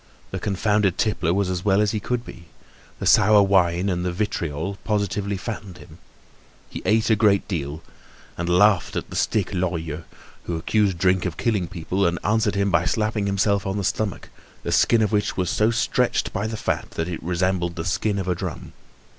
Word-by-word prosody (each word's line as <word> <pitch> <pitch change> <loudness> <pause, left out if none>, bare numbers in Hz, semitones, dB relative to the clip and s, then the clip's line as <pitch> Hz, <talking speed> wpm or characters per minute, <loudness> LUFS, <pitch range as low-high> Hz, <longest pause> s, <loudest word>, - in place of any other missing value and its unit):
The 95 - -3
confounded 105 -1 +1
tippler 105 -6 +1
was 100 +1 +1
as 90 -1 -3
well 100 -1 +3
as 105 +1 +2
well 110 - -1
could 120 -1 -2
be. 85 - -11 0.5
The - - -5
sour 105 0 +6
wine 95 -2 +2
and 90 -2 -1
the 90 - -1
"vitriol" 85 -1 -3
positively 100 -1 -1
fattened 100 -3 -6
him. 80 0 -15 0.7
He - - -6
ate 110 +1 +2
a - - +6
great 105 -2 +3
deal, 80 -4 -4 0.5
and 85 +1 -3
laughed 90 +1 +3
at - - -4
that - - -6
stick 105 -2 0
Lorilleux, 85 -4 -2 0.4
who 85 - -2
accused 100 +2 +1
drink 90 +1 +2
of 85 - -6
killing 105 -7 0
people, 95 +1 -1
and 85 0 -1
answered 105 -1 +1
him 100 0 +1
by - - +2
slapping 105 -2 0
himself 100 0 +1
on 95 +1 -2
the 100 - -2
stomach, 100 +1 -2 0.3
the - - -3
skin 115 -1 +4
of 105 - 0
which 105 -1 0
was 90 -2 0
so 110 +1 +2
stretched 115 -1 0
by 105 +3 -1
the 110 0 -4
fat - - -2
that 80 - -2
it 90 -2 -5
resembled 90 0 -1
the 80 -1 -4
skin 100 +5 0
of 95 -2 -3
a 90 - +2
drum. 85 - -6
95 Hz, 195 wpm, -23 LUFS, 90-105 Hz, 0.7 s, sour